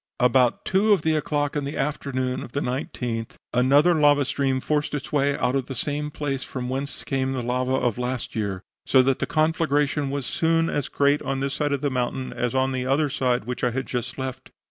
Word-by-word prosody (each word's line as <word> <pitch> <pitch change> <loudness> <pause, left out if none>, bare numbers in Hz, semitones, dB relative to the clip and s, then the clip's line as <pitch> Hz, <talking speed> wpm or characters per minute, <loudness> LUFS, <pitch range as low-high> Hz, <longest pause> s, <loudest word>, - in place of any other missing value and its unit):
"About 125 0 +3
two 205 +3 +4
of 200 - +1
the 155 -1 +2
clock 145 -1 -1
in 145 - 0
the 140 +1 -4
afternoon 130 -2 -2
(19th) 125 -3 -3 0.2
another 140 +7 +5
lava 145 -3 +4
stream 135 -1 0
forced 150 +2 -1
its 140 -1 -5
way 145 -1 +2
out 125 +1 0
of 135 -2 -1
the 135 - -5
same 150 +4 -2
place 140 -3 -3
from 125 -1 -5
whence 135 +2 -3
came 135 -1 -1
the 130 -2 -2
lava 125 +2 0
of 125 -3 0
last 125 0 -3
year, 100 -3 -2 0.2
so 130 -1 +6
that 135 0 +1
the - - -1
conflagration 150 -2 +1
was 140 -1 -3
soon 165 +3 +1
as 145 - -2
great 145 +1 +2
on 135 0 -2
this 135 0 -1
side 145 0 -1
of 140 -2 0
the 145 - 0
mountain 130 +1 -2
as 120 0 -2
on 130 0 +2
the 130 -1 -2
other 140 +3 +1 0.4
which 125 +1 -5
I 125 - +4
had 130 +2 -3
just 120 -1 -4
left. 130 0 -5
135 Hz, 210 wpm, -24 LUFS, 125-145 Hz, 0.4 s, so